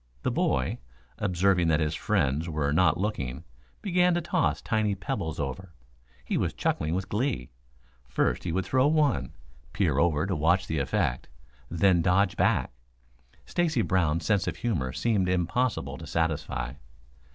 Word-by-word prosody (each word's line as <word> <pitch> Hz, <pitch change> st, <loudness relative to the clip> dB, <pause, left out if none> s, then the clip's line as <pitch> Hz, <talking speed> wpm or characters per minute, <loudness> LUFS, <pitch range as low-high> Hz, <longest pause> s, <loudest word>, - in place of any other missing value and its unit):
The -, -, +1 dB
boy, 65 Hz, -1 st, 0 dB, 0.4 s
observing 95 Hz, -2 st, +2 dB
that 80 Hz, 0 st, +3 dB
his 75 Hz, 0 st, 0 dB
friends 80 Hz, -3 st, 0 dB
were 75 Hz, -2 st, 0 dB
not 90 Hz, +2 st, +3 dB
looking, 75 Hz, -, -3 dB, 0.4 s
began 180 Hz, -2 st, +3 dB
to 175 Hz, -, 0 dB
toss 170 Hz, +1 st, 0 dB
tiny 110 Hz, -3 st, 0 dB
pebbles 85 Hz, -4 st, -4 dB
over. 85 Hz, +6 st, -5 dB, 0.5 s
He -, -, -1 dB
was -, -, -1 dB
chuckling 75 Hz, +2 st, -1 dB
with 95 Hz, +1 st, -2 dB
glee. 105 Hz, -, -2 dB, 0.6 s
First -, -, 0 dB
he 85 Hz, -, -2 dB
would 90 Hz, +2 st, -1 dB
throw 130 Hz, +6 st, +3 dB
one, 145 Hz, -, +1 dB, 0.4 s
peer 80 Hz, -9 st, +1 dB
over 80 Hz, 0 st, +2 dB
to 95 Hz, -2 st, -1 dB
watch 85 Hz, +5 st, +2 dB
the 80 Hz, -4 st, -2 dB
effect, 65 Hz, -2 st, -1 dB, 0.4 s
then 85 Hz, +1 st, +3 dB
dodge 90 Hz, +2 st, +2 dB
back. -, -, +1 dB, 0.7 s
Stacy 160 Hz, -9 st, +1 dB
Brown's 85 Hz, -2 st, +1 dB
sense 100 Hz, -3 st, +1 dB
of -, -, -2 dB
humor 80 Hz, -, -1 dB
seemed 100 Hz, -, 0 dB
impossible 95 Hz, +7 st, -1 dB
to -, -, -9 dB
satisfy. 80 Hz, -6 st, -1 dB
90 Hz, 150 wpm, -27 LUFS, 75-105 Hz, 0.7 s, that